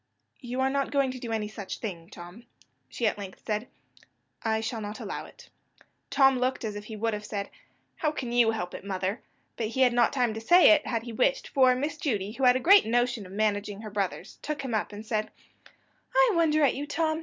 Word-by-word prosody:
"You 250 +1 -4
are 265 - +2
not 275 0 0
going 275 -2 +1
to 255 - -8
do 235 -2 -6
any 220 -2 -1
such 205 -2 -7
thing, 175 -6 -6
Tom," 180 +5 -12 0.4
she 230 - -3
at 210 - +1
length 195 -2 -9
said; 215 +2 -2 0.7
"I 220 -1 0
shall 225 0 -3
not 210 0 -6
allow - - -5
it." - - -16 0.6
Tom 270 -2 +4
looked 255 -1 -1
as 210 -1 -4
if 205 0 -7
he 220 - -7
would 225 +1 -1
have 210 0 -4
said, 205 -1 -5 0.5
"How 305 - 0
can 260 -5 -5
you 240 -2 +4
help 180 -6 -3
it, - - -8
mother?" 195 +3 -3 0.4
but 225 - -1
he 230 +4 -2
had 250 -2 +5
not 240 0 +3
time 245 -5 +1
to 220 - -6
say 350 +11 +7
it, 315 -1 +3
had 230 -2 -1
he 235 -1 -7
wished; - - +1
for 260 -2 +4
Miss 290 +4 -3
Judy, 210 -9 -2
who 260 +4 -1
had 250 0 +6
a - - +1
great 390 - +6
notion 240 -3 0
of - - -14
managing 205 0 -1
her 215 -1 -8
brothers, 200 -2 -3
took 300 -2 -4
him 255 -3 -4
up, 215 - -1
and 210 +1 -9
said: 215 -1 -1 0.9
"I - - +5
wonder 315 -3 +3
at 275 - +4
you, 290 +2 -5
Tom. 315 0 0
230 Hz, 230 wpm, -28 LUFS, 210-270 Hz, 0.9 s, say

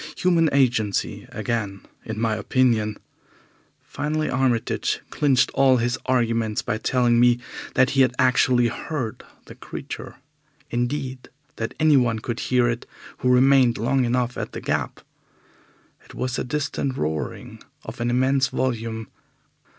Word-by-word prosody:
Human 170 -3 +3
agency 120 -7 +1
again, 105 -4 -3 0.2
in 110 -1 -5
my 115 -1 +1
opinion. 110 0 +1 0.9
Finally, 155 +2 -2
Armitage 130 -3 0
clinched 135 -4 +2
all 135 -1 +4
his 120 +2 -1
arguments 115 -4 +1
by 110 - -2
telling 120 -1 +2
me 120 0 +5 0.4
that 130 -1 +4
he 135 - +3
had 130 - +4
actually 130 -2 +3
heard 120 -1 -4 0.2
the - - -11
Creature - - -8 0.6
indeed, 130 +2 -3 0.3
that 115 - -4
anyone 135 -7 +4
could 115 +2 -4
hear 125 -1 +2
it 120 0 -3 0.3
who 125 - +1
remained 125 -1 +5
long 130 +4 +1
enough 125 0 0
at - - -5
the - - -5
Gap. - - -2 1.0
It - - -15
was 125 0 -2
a - - -1
distant 140 -1 -2
roaring 75 0 -4 0.2
of - - -7
an 120 - 0
immense 130 +2 +2
volume. 115 -4 -2
125 Hz, 135 wpm, -23 LUFS, 115-130 Hz, 1.0 s, me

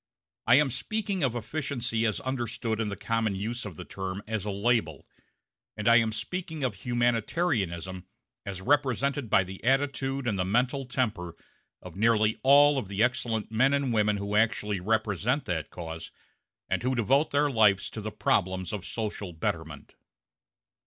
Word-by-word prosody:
I 120 - +7
am 145 -1 +4
speaking 205 - -2
of 130 -5 +1
efficiency 120 -2 -1
as 110 - -1
understood 120 -4 -3
in 110 - -1
the 100 - -4
common 115 -2 -1
use 115 +5 -4
of 100 -5 -7
the - - -8
term 95 +1 -5
as 110 -2 -3
a - - -2
label; 100 - 0 0.7
and 105 0 -2
I 115 0 +8
am 115 -2 +2
speaking 160 +5 -5
of 125 -4 0
humanitarianism 105 - -1 0.4
as 95 -1 -6
represented 140 -1 +1
by 95 - +4
the 95 +1 -10
attitude 135 +1 0
and 105 -5 -1
the - - +2
mental 125 +7 0
temper 110 -9 -2 0.5
of - - -10
nearly 110 +1 +2
all 145 +1 +6
of 110 - -6
the 100 +3 0
excellent 120 -3 -1
men 130 +5 +3
and 140 -4 0
women 105 -1 +2
who 100 +1 -3
actually 105 -2 +1
represent 110 - 0
that 80 -4 -3
cause 80 -2 -7 0.6
and - - -1
who 130 +2 0
devote 135 +6 +2
their 145 0 +2
lives 105 -5 +4
to 110 - -6
the 110 +1 -4
problems 95 -3 0
of 100 -4 -4
social 105 -5 -4
betterment. 80 -1 -4
115 Hz, 165 wpm, -28 LUFS, 100-130 Hz, 0.7 s, I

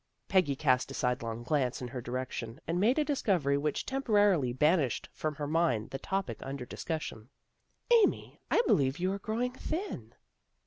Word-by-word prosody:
Peggy 185 -8 +3
cast 130 -1 +2
a 135 - -6
sidelong 120 -2 -1
glance 130 -2 0
in 125 - -5
her 125 -1 -5
direction, 120 0 -4
and 170 +2 -1
made 230 +8 +3
a 305 - +2
discovery 185 - +1
which 145 +1 -1
temporarily 205 - +2
ban 150 +8 +4
ished 130 -5 -1
from 155 -1 -3
her 145 0 -3
mind 150 -8 +1
the 135 - -4
topic 195 +5 -2
under 135 -2 -5
discussion. 130 -7 -5 0.3
" 480 - -4
Amy, 410 - 0
I 470 - +4
believe 135 - +3
you 185 +2 0
are 200 - -4
growing 230 +5 -1
thin." 345 +9 -5
150 Hz, 175 wpm, -31 LUFS, 130-195 Hz, 0.3 s, ban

